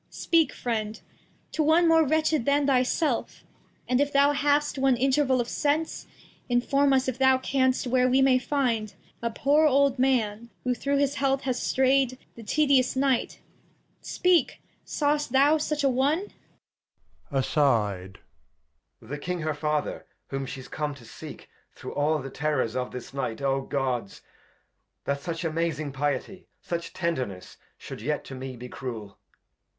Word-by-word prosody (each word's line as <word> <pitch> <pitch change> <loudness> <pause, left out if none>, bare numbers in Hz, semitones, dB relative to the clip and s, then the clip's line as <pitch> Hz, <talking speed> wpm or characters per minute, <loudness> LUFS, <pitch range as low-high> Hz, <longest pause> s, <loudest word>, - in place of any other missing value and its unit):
Speak, 325 -5 +2
Friend, 220 -3 -3 0.5
to - - -1
one 320 +3 +4
more 325 0 +5
wretched 310 -2 +1
than 285 0 +2
thy 265 -2 +4
self; 255 0 -1 0.4
And 250 +2 +2
if 285 0 +1
thou 280 +1 +4
hast 290 0 +1
one 265 -2 +3
Interval 265 0 +2
of 240 - -1
Sense, 300 +4 -1 0.4
Inform 275 +3 +2
us, 265 -1 +2
if 260 -1 -3
thou 265 0 +5
canst, 260 0 +1
where 255 0 +2
we 260 +1 +3
may 265 -1 +4
find 245 -6 -1 0.3
A 235 - -1
poor 290 +7 +3
old 275 -2 +3
Man, 235 -4 +1
who 250 - +1
through 280 +4 -1
this 285 0 +1
heath 270 0 +1
has 255 -2 -2
stray'd 265 -1 +2 0.2
The 235 - -12
tedious 265 +2 +2
Night. 265 -2 0 0.3
— - - -41
Speak, 360 -2 +2 0.2
sawest 295 -3 -1
thou 285 +4 +5
such 300 -1 -1
a - - +4
one? 285 +9 +1 1.0
Edg. 110 -9 +1 0.9
The 140 +6 -6
King 180 +3 -3
her 155 0 -1
Father, 150 0 -2 0.2
whom 135 -1 -4
she's 130 0 -8
come 150 -2 -3
to 125 -4 -15
seek; - - -10 0.3
Through - - -8
all 150 +2 +1
the 135 -2 -7
Terrors 135 -6 -1
of 125 -1 -2
this 125 +1 -8
Night: 125 -5 -3
OGods! 135 -5 -1
[Aside. - - -16 0.8
That 140 0 -1
such 165 +2 -4
amazing 160 -2 -2
Piety, 145 +7 -3
such 170 -1 -5
Tenderness 130 - -4 0.2
Shou'd - - -9
yet 150 +6 -2
to - - -10
me 130 -1 -7
be 125 +1 -8
Cruel. 115 -6 -7
250 Hz, 155 wpm, -26 LUFS, -, 1.0 s, more